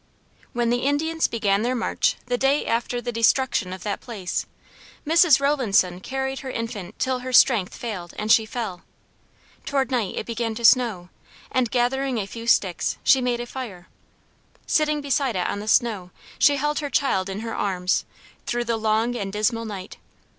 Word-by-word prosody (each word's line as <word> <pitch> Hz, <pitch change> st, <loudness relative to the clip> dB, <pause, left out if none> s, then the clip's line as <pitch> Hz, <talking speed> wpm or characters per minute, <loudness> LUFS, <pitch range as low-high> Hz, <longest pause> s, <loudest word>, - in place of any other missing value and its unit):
When 240 Hz, -1 st, 0 dB
the 245 Hz, -, +1 dB
Indians 310 Hz, +5 st, +1 dB
began 205 Hz, -3 st, +1 dB
their 245 Hz, +3 st, 0 dB
march 235 Hz, -, 0 dB
the 245 Hz, 0 st, 0 dB
day 270 Hz, +3 st, +1 dB
after 240 Hz, +1 st, -1 dB
the 240 Hz, -, -3 dB
destruction 230 Hz, -3 st, +2 dB
of 185 Hz, -1 st, -7 dB
that 205 Hz, -, -3 dB
place, 205 Hz, -7 st, -4 dB, 0.6 s
Mrs. 325 Hz, -3 st, +5 dB
Rowlandson 225 Hz, -11 st, +2 dB
carried 265 Hz, +5 st, -3 dB
her 265 Hz, -, -7 dB
infant 225 Hz, -5 st, -5 dB
till 260 Hz, -1 st, 0 dB
her 255 Hz, +1 st, -6 dB
strength 230 Hz, -6 st, +4 dB
failed 195 Hz, -8 st, -6 dB
and 215 Hz, +1 st, -1 dB
she 220 Hz, -1 st, +5 dB
fell. 215 Hz, -7 st, -5 dB, 0.8 s
Toward 270 Hz, -3 st, -1 dB
night 230 Hz, -7 st, -1 dB
it -, -, -3 dB
began 230 Hz, -1 st, -3 dB
to 235 Hz, +1 st, -2 dB
snow; 225 Hz, -8 st, +4 dB, 0.4 s
and 255 Hz, -3 st, +1 dB
gathering 255 Hz, +1 st, 0 dB
a 205 Hz, -, -1 dB
few 230 Hz, +3 st, -8 dB
sticks, 190 Hz, -6 st, +2 dB
she 265 Hz, -, +5 dB
made 245 Hz, -1 st, 0 dB
a -, -, -4 dB
fire. 225 Hz, -9 st, -8 dB, 0.8 s
Sitting 305 Hz, -1 st, +1 dB
beside 275 Hz, -4 st, 0 dB
it 180 Hz, -, 0 dB
on 205 Hz, -, -2 dB
the 210 Hz, -, -7 dB
snow, 215 Hz, -6 st, +1 dB, 0.3 s
she 285 Hz, -, +5 dB
held 295 Hz, +2 st, -1 dB
her 290 Hz, -2 st, -3 dB
child 200 Hz, -9 st, +1 dB
in 195 Hz, +2 st, -4 dB
her 225 Hz, 0 st, -5 dB
arms, 185 Hz, -2 st, 0 dB, 0.4 s
through 240 Hz, 0 st, 0 dB
the 230 Hz, -1 st, 0 dB
long 220 Hz, +2 st, +1 dB
and 200 Hz, -4 st, -3 dB
dismal 225 Hz, +3 st, 0 dB
night. 200 Hz, -3 st, -7 dB
235 Hz, 175 wpm, -24 LUFS, 205-260 Hz, 0.8 s, Mrs